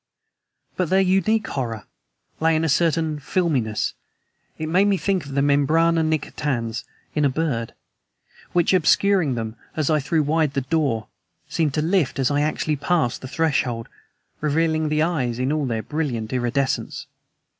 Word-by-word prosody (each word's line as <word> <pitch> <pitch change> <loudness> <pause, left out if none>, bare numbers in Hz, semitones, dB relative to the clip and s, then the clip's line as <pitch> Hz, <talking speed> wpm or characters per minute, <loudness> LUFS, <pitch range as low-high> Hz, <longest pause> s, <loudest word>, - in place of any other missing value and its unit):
But 180 -4 0
their 190 - +4
unique 195 +4 +2
horror 115 -7 -4 0.5
lay 160 0 +3
in 155 - +1
a - - 0
certain 160 0 +1
filminess 135 - 0 0.6
(it 155 - -3
made 185 +5 +3
me 200 -1 +3
think 190 -5 -1
of 135 - -7
the 140 - +3
membrana 160 +4 +3
nictitans 130 -7 -2 0.3
in 150 - +1
a 140 - +4
bird) 130 -6 -2 0.8
which, 175 +1 +2
obscuring 185 -4 +3
them 110 -1 -4 0.2
as 155 -1 0
I 155 - +3
threw 155 +2 +1
wide 150 -1 +1
the 135 - +1
door, 135 -6 0 0.4
seemed 155 -4 0
to 150 - +1
lift 170 -3 +1
as 135 0 +1
I 145 0 +2
actually 150 0 0
passed 150 -4 0
the 130 - -6
threshold, 130 -6 0 0.5
revealing 155 +1 +1
the 155 +1 +2
eyes 135 -9 -1
in 130 +2 0
all 150 -3 0
their 110 -2 -2
brilliant 130 -8 -3
iridescence. 130 +2 -1
150 Hz, 155 wpm, -23 LUFS, 130-165 Hz, 0.8 s, their